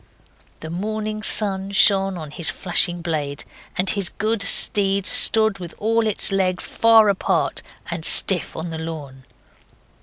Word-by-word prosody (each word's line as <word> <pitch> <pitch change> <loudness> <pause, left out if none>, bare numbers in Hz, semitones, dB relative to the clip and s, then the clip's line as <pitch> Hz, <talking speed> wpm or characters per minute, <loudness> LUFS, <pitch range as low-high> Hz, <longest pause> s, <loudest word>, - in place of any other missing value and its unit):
The 160 - -9
morning 215 +3 -6
sun 200 -3 -1
shone 195 -1 +1
on 155 -3 -10
his 165 +1 0
flashing 175 -1 -2
blade, 150 -4 -5 0.3
and 185 - -3
his 195 -3 +1
good 220 0 -4
steed 195 -1 +3
stood 220 -2 +3
with 175 -2 -11
all 225 +1 -2
its 210 - -1
legs 185 -2 -2
far 225 -1 +2
apart 200 -2 -2 0.3
and 170 -2 -7
stiff 180 +2 +5
on 165 +1 -7
the 160 - -7
lawn. 145 -5 -10
195 Hz, 145 wpm, -19 LUFS, 165-210 Hz, 0.3 s, stiff